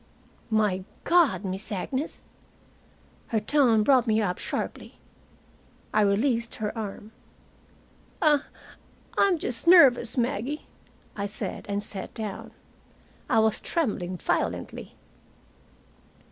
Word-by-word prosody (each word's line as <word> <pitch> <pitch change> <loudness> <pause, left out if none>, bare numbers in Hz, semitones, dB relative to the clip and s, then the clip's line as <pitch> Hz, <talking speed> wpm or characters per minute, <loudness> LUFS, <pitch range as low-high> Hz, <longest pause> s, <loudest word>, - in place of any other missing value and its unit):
"My 210 -4 +1 0.2
God, 335 - +3
Miss 190 +3 -5
Agnes!" 260 - -4 1.0
Her 225 - 0
tone 230 -2 +3
brought 255 -1 +4
me 220 0 +3
up 180 -4 -1
sharply. - - -5 1.0
I 215 - +4
released 230 +4 +1
her 210 +1 -4
arm. 215 -1 -6 1.1
"I 295 -3 +4 0.7
I'm 385 -3 +3
just 245 0 -2
nervous, 265 -9 +6
Maggie," 245 +4 -1 0.5
I 200 0 -2
said, 205 - -5
and 200 0 -1
sat 195 -2 -5
down. 215 -3 -5 0.8
I 225 - +3
was 220 -1 +3
trembling 200 - -2
violently. - - -3
220 Hz, 105 wpm, -26 LUFS, 205-265 Hz, 1.1 s, nervous